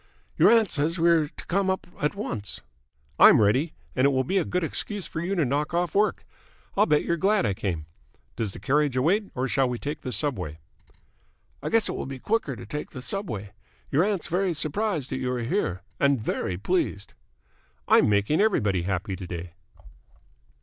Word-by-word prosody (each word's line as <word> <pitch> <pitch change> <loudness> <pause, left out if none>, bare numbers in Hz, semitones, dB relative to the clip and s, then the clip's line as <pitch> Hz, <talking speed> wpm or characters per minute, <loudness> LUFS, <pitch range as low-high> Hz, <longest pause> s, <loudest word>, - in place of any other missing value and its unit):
"Your - - +6
aunt 225 -4 +4
says 160 +3 0
we 170 0 +4
are 160 -3 +3
to - - -12
come 190 +1 +1
up 190 - -1 0.2
at 150 +6 0
once." 115 - -5 0.6
"I'm - - +9
ready. 130 +10 +2 0.2
And 130 - +3
it - - +6
will 130 -1 +1
be 190 +9 +1
a - - +1
good 180 +2 -1
excuse 200 +5 -3
for 160 - -5
you 185 +3 -1
to 165 -5 +2
knock 145 +5 -1
off 175 -2 0
work. 210 +1 +1 0.5
I 205 - +4
bet 150 -7 +2
you're 170 - 0
glad 200 - +2
I 100 - +1
came! 90 -5 -3 0.5
Does 110 -4 -2
the - - -10
carriage 140 +5 +1
await 195 +10 +2
or 130 +1 -1
shall 135 0 +2
we 125 - -2
take 145 +4 -5
the 130 - -5
subway?" 95 - -1 1.0
"I - - -3
guess 225 -1 +3
it - - -2
will - - -4
be 135 -1 -6
quicker 150 - -1
to - - -9
take 150 +8 -5
the 130 - -8
subway. 110 - -4 0.4
Your 145 +5 +4
aunt's 200 -3 -1
very 180 0 0
surprised 155 - -1
that 130 - -1
you 125 -1 -1
are 120 -1 -2
here, 115 - -1 0.2
and 140 -2 +3
very 95 -4 -2
pleased." 100 - -1 0.7
"I'm - - +5
making 105 - +2
everybody 105 - +2
happy 95 +2 -2
to 95 -1 -8
day." 85 -1 -6
145 Hz, 200 wpm, -26 LUFS, 110-180 Hz, 1.0 s, I'm